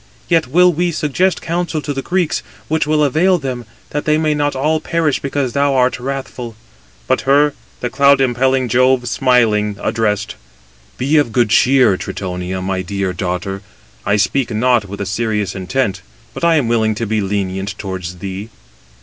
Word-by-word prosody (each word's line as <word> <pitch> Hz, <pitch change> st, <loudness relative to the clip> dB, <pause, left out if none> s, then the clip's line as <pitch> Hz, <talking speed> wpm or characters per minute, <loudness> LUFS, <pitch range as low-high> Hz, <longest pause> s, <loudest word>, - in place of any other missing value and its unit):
Yet 165 Hz, -4 st, +2 dB
will 180 Hz, +6 st, +4 dB
we 175 Hz, +2 st, 0 dB
suggest 160 Hz, +4 st, 0 dB
counsel 170 Hz, -1 st, -2 dB
to 145 Hz, -, -3 dB
the 135 Hz, -, -3 dB
Greeks, 175 Hz, +1 st, 0 dB, 0.3 s
which 160 Hz, -1 st, 0 dB
will 150 Hz, 0 st, +2 dB
avail 170 Hz, +6 st, +3 dB
them, 130 Hz, -5 st, -5 dB, 0.3 s
that 145 Hz, -, -3 dB
they 155 Hz, 0 st, +3 dB
may 155 Hz, -1 st, +1 dB
not 145 Hz, -1 st, 0 dB
all 155 Hz, +4 st, +1 dB
perish 165 Hz, -4 st, 0 dB
because 135 Hz, -2 st, -2 dB
thou 140 Hz, -1 st, +2 dB
art 125 Hz, -1 st, +2 dB
wrathful." 125 Hz, -3 st, -5 dB, 0.5 s
But -, -, +1 dB
her 145 Hz, +1 st, +4 dB, 0.3 s
the 125 Hz, -, -1 dB
cloud 140 Hz, +1 st, +4 dB
impelling 130 Hz, 0 st, +2 dB
Jove 130 Hz, +1 st, +2 dB
smiling 115 Hz, -5 st, +2 dB
addressed: 105 Hz, -2 st, -1 dB, 0.6 s
"Be 140 Hz, +5 st, +2 dB
of 145 Hz, -6 st, +2 dB
good 120 Hz, -2 st, +2 dB
cheer, 125 Hz, -4 st, +4 dB
Tritonia, 90 Hz, 0 st, -4 dB
my 95 Hz, 0 st, -1 dB
dear 95 Hz, 0 st, -2 dB
daughter—I 95 Hz, +3 st, -4 dB
speak 120 Hz, +5 st, +1 dB
not 120 Hz, 0 st, +2 dB
with 100 Hz, +1 st, -7 dB
a -, -, -2 dB
serious 105 Hz, 0 st, -1 dB
intent; 95 Hz, +1 st, -2 dB, 0.3 s
but -, -, -8 dB
I 170 Hz, -1 st, +4 dB
am 140 Hz, -7 st, +2 dB
willing 110 Hz, -2 st, +1 dB
to 115 Hz, -, -2 dB
be 110 Hz, 0 st, 0 dB
lenient 95 Hz, 0 st, -3 dB
towards 95 Hz, -3 st, -5 dB
thee." 95 Hz, +3 st, -6 dB
125 Hz, 165 wpm, -17 LUFS, 100-145 Hz, 0.6 s, will